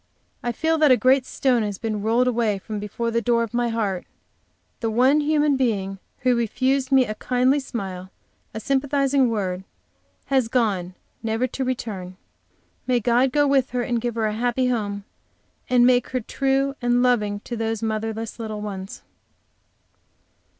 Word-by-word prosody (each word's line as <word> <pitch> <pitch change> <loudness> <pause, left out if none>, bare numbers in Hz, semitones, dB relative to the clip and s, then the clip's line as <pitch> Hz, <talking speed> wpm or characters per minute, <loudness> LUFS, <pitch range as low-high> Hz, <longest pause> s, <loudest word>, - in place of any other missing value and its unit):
I 240 - -1
feel 320 +7 0
that 305 -2 +5
a 255 - +6
great 260 0 +3
stone 250 -3 +1
has 205 -2 -3
been 215 -1 -3
rolled 230 +4 +2
away 230 -4 +1
from 210 +2 -6
before 220 +3 -3
the 230 0 +1
door 235 +1 +2
of 230 - -6
my 240 0 +1
heart; 205 -5 -2 0.7
the 225 - -1
one 255 +6 +4
human 300 -1 +2
being 200 -7 -1 0.2
who 250 -1 +3
refused 260 +4 0
me 265 -1 +5
a 215 - -4
kindly 255 +5 +1
smile, 190 -8 -6 0.4
a 220 - -5
sympathizing 275 +1 +1
word, 190 -4 -2 0.6
has 265 -3 +2
gone, 200 -7 0 0.3
never 225 +2 0
to 260 +1 -3
return. 205 -8 -4 0.7
May 250 -1 +3
God 245 +3 +2
go 290 +2 +3
with 275 -2 +2
her 245 - +1
and 240 -1 -1
give 240 -1 -2
her 225 -1 0
a 215 - 0
happy 245 +3 0
home, 205 -4 -2 0.7
and 245 -1 +5
make 250 -1 +3
her 255 - -1
true 270 +3 0
and 245 0 +2
loving 210 -5 +1
to 240 - -6
those 225 -1 -2
motherless 220 +1 -3
little 215 -2 -4
ones! 195 -2 -7
235 Hz, 165 wpm, -23 LUFS, 215-255 Hz, 0.7 s, a